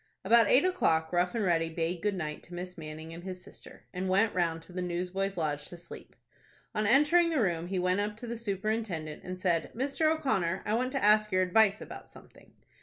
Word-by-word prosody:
About 230 +1 +5
eight 265 - +5
o'clock 160 - +1
Rough 180 +4 +1
and 225 - 0
Ready 165 -3 +1
bade 165 +1 -2
goodnight 175 -8 -2
to 175 - -10
Miss 180 +1 -6
Manning 160 0 -8
and 170 +1 -9
his 185 -1 -7
sister, - - -14
and 185 +1 -3
went 200 +4 +3
round 165 -2 0
to 180 - -13
the 180 - -3
Newsboys' 180 +2 -2
Lodge 150 -3 -2
to 175 - -10
sleep. 170 0 -12 0.6
On 215 0 0
entering 300 +8 +5
the 320 -4 0
room 175 -6 0
he 190 +1 -2
went 180 +1 +1
up 210 +1 -2
to 240 - -7
the 235 0 -4
superintendent, 200 -7 -3
and 185 0 -6
said, 170 -3 0
"Mr. 280 +5 +1
O'Connor, 195 - 0
I 210 - -1
want 255 +3 0
to 270 - -1
ask 210 0 +4
your 185 0 +3
advice 205 +3 +3
about - - -9
something." - - -17
185 Hz, 210 wpm, -30 LUFS, 170-220 Hz, 0.6 s, About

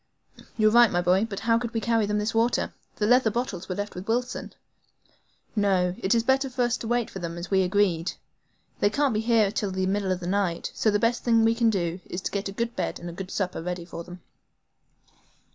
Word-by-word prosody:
"You're 215 -1 +4
right 240 0 +7
my 175 - 0
boy; 185 +5 +3
but 200 - -5
how 230 0 +3
could 235 0 -5
we - - +2
carry 225 -2 +1
them 210 0 0
this 210 +1 -1
water? 230 +2 +1 0.2
The 210 - 0
leather 245 +1 +4
bottles 215 -6 -3
were 185 - -2
left 205 +1 -4
with 180 +2 -8
Wilson. 245 +2 -2 1.0
No; 190 -4 +2
it 190 +5 +2
is 230 - +2
better 265 +2 +2
for 250 0 -1
us 240 0 +1
to 225 - -6
wait 240 0 +1
for 190 - -6
them 170 -1 -5
as 170 +3 -7
we 190 -1 +4
agreed. 185 -3 +1 0.7
They 205 - +3
can't 280 +2 +1
be 215 - 0
here 225 -3 +3
till 205 -1 -2
about 190 - -6
the 190 - +1
middle 195 0 0
of 185 - -1
the 175 - -7
night, 185 -2 -1
so 220 - +1
the 205 - +3
best 230 +2 0
thing 230 -2 +4
we 225 0 +4
can 230 0 +2
do 175 -4 -1
is 175 - -4
to - - -3
get 200 -1 -2
a - - -5
good 235 +3 -3
bed - - -2
and 175 0 -6
a - - -10
good 185 +1 -7
supper 185 -4 -2
ready 175 0 -4
for 170 -1 -7
them." 180 +1 -11
205 Hz, 245 wpm, -26 LUFS, 185-230 Hz, 1.0 s, right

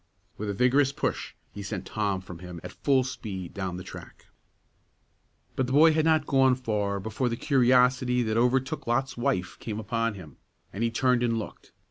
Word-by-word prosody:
With 105 0 -4
a 100 - -2
vigorous 130 +5 +3
push, - - -3 0.2
he 100 - -8
sent 100 -2 -5
Tom 100 -3 -1
from 90 -2 -10
him 90 -1 -8
at - - -7
full 135 -2 +2
speed 100 -8 -6
down 95 -3 -4
the 90 - -7
track. - - -11 1.3
But 130 - 0
the 130 - -2
boy 160 +3 +7
had 155 0 +2
not 160 -2 +3
gone 135 -1 +4
far 105 -5 -1
before 110 +5 -2
the 115 - -3
curiosity 125 -1 +3
that 110 -1 -1
overtook 130 +5 +1
Lot's 135 +3 0
wife 90 -7 -1
came 110 -2 -5
upon 115 +1 -1
him, 80 -7 -12 0.4
and 105 - -2
he 115 - +2
turned 125 +1 +2
and 115 -1 +1
looked. 110 - -8
115 Hz, 185 wpm, -27 LUFS, 100-130 Hz, 1.3 s, boy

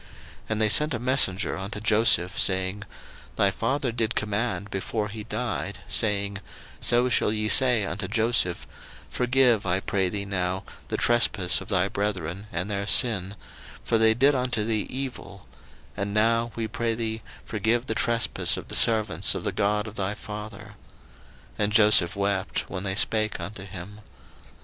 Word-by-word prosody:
01:050:016 - - -21 0.4
And 110 0 -1
they 110 - +3
sent 150 +6 +4
a - - -4
messenger 120 -8 +2
unto 100 +2 -6
Joseph, 105 -4 +2
saying, 95 +2 0 0.5
Thy 100 -1 +2
father 130 +5 -2
did 115 0 -2
command 105 -2 -2
before 105 +2 -3
he 105 +1 -7
died, 120 +4 -4
saying, 100 +5 +2 0.4
01:050:017 - - -12
So 120 +1 +3
shall 110 - +1
ye 105 0 -2
say 120 -2 +4
unto 100 -1 -4
Joseph, 110 -4 0 0.5
Forgive, 125 -3 +2
I 90 +2 +1
pray 95 -1 -1
thee 100 +1 -4
now, 95 -1 -2 0.2
the - - -3
trespass 105 -7 +2
of 95 - -10
thy 95 -2 +1
brethren, 100 -2 -4
and 85 +3 -3
their 100 -1 -3
sin; 100 -5 +3 0.5
for 115 - +1
they 110 0 +4
did 135 +4 +4
unto 125 -4 0
thee 110 -2 -1
evil: 125 -8 -7 0.5
and 100 0 -4
now, 115 +2 +2
we 115 -1 -3
pray 115 +1 -2
thee, 110 -1 -4 0.2
forgive 115 +3 -1
the 110 - -2
trespass 115 +1 +1
of - - -9
the - - -4
servants 110 -2 +3
of - - -5
the - - -2
God 105 +1 0
of 110 0 -10
thy 100 +1 -2
father. 105 0 -9 0.9
And 105 0 +1
Joseph 105 -4 +4
wept 100 -1 -2
when 90 - -6
they 95 -1 -3
spake 110 -1 0
unto 95 +3 -7
him. 95 +2 -10
105 Hz, 165 wpm, -25 LUFS, 100-115 Hz, 0.9 s, sent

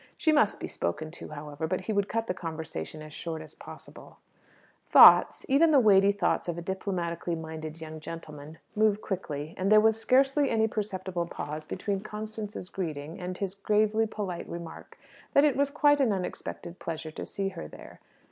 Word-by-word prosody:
She 315 - +2
must 295 -9 +3
be - - -4
spoken 155 - -3
to, 170 - -9
however; 150 +1 -5
but 185 +2 -1
he 215 +4 -3
would 200 0 0
cut 225 0 -1
the 180 - -2
conversation 160 - -6
as 155 -1 -11
short 165 0 -5
as 155 -1 -11
possible. - - -13 0.7
Thoughts - - +8
even 285 +5 +5
the 295 -3 +6
weighty 200 -4 +6
thoughts 200 - 0
of 175 -1 -3
a - - -4
diplomatically 175 -3 -3
minded 160 0 -7
young 155 0 -7
gentleman 155 -1 -9 0.2
move 215 -1 +3
quickly, 155 -7 -4
and 190 +2 +1
there 215 - +8
was 220 +1 +3
scarcely 270 +4 +3
any 220 -1 +2
perceptible 190 -5 -3
pause 155 -1 -6
between 200 -2 -2
Constance's 215 -1 -6
greeting 160 -3 -5
and 180 0 -5
his 195 -2 -3
gravely 215 +2 +1
polite 200 -5 -5
remark 170 -1 -9 0.4
that 280 - +6
it 290 - +3
was 280 0 +2
quite 290 0 +3
an 250 -5 +3
unexpected 180 -2 -5
pleasure 160 -1 -5
to - - -7
see 195 -1 -3
her 170 -3 -8
there. - - -13
185 Hz, 180 wpm, -28 LUFS, 160-215 Hz, 0.7 s, Thoughts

